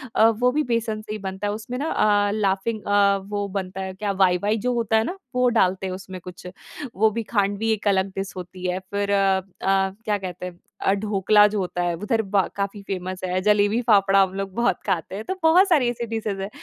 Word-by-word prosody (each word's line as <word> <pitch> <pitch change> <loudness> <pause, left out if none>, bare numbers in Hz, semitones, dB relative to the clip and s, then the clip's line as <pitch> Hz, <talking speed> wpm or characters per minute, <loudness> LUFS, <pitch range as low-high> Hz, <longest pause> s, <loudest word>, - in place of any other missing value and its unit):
अ, 220 - +6
वो 245 +3 +1
भी 300 +3 +1
बेसन 230 -3 -1
से 215 - -10
ही 215 - -3
बनता 190 +1 -4
है 205 - -1
उसमें 225 +4 -6
ना 295 +5 -2
अ, 205 -1 +2
लाफ़िंग 210 +1 -1
अ, 200 -1 +4
वो 205 -1 -2
बनता 190 0 -4
है 190 0 -5
क्या 200 +2 -3
वाई-वाई 195 +2 +2
जो 250 - +2
होता 225 -2 +1
है 220 - +3
ना, 365 +11 -4 0.2
वो 250 0 +3
डालते 190 -4 +1
हैं 185 - -4
उसमें 185 0 -8
कुछ। 180 0 -10 0.5
वो 220 +3 +4
भी 230 +2 -3
खाँडवी 205 0 0
एक 215 -1 -1
अलग 190 -1 +2
डिश 195 0 -4
होती 185 0 -8
है। 180 +1 -1
फिर 200 +2 -3
अ 195 -1 +3
अ, - - -11 0.6
क्या 210 -1 +1
कहते 180 -2 -6
हैं 175 -1 -8 0.2
अ, 195 - +2
ढोकला 210 0 +3
जो 210 0 -2
होता 180 -1 -2
है 175 -1 0
उधर 210 +5 0
ब 195 -2 +1
काफ़ी 200 +1 -3
फेमस 185 -1 -4
है, 185 0 0
जलेबी-फाफड़ा 205 -1 +3
हम 190 -1 +1
लोग 195 -1 -4
बहुत 240 +1 +1
खाते 185 -2 -2
हैं 210 - -5
तो 380 - -3
बहुत 355 +5 +6
सारी 285 -9 +3
ऐसी 240 0 -3
डिशेज़ 215 -3 -3
हैं। 195 - -4
200 Hz, 225 wpm, -23 LUFS, 190-220 Hz, 0.6 s, अ